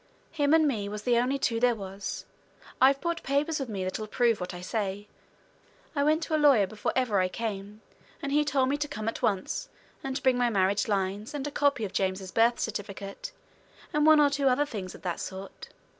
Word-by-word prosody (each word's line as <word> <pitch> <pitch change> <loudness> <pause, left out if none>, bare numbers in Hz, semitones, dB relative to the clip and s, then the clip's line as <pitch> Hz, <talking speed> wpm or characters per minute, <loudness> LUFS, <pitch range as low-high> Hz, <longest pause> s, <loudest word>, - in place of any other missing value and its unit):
"Him 290 -3 +1
and 315 -1 +4
me 210 -7 -1
was 210 0 -6
the 240 0 +3
only 255 +3 +1
two 230 -4 0
there 245 0 +3
was. 195 -1 -6 0.6
I've 270 +1 +6
brought 340 +1 -2
papers 295 +3 0
with 270 -3 -4
me 195 -3 -3
that'll 185 +4 -3
prove 230 -2 +1
what 180 - -4
I 175 - -7
say. 200 +1 -3 0.9
I 285 - +2
went 310 +3 +2
to 315 - -1
a 305 - +1
lawyer 270 -9 +6
before 210 +2 -3
ever 245 -6 +2
I 185 - +2
came, 210 0 -5 0.4
and 280 - -4
he 300 +1 +3
told 270 -3 +1
me 285 - +1
to 295 0 -2
come 215 -7 -5
at 225 - -3
once, 195 -3 -1 0.3
and 270 -1 -3
to 280 - -4
bring 255 -1 +3
my 245 -1 +3
marriage 200 -1 +1
lines, 200 +4 -2
and 285 -1 -3
a 290 - -3
copy 280 -6 +1
of 195 - -7
James's 190 -1 -1
birth 230 +1 +3
certificate, 205 - -5 0.6
and 300 0 +2
one 310 -1 +8
or 290 -1 +5
two 280 -1 +1
other 265 +3 +3
things 200 -10 -6
of - - -14
that 175 -2 -2
sort. 190 +1 -8
230 Hz, 220 wpm, -28 LUFS, 200-280 Hz, 0.9 s, one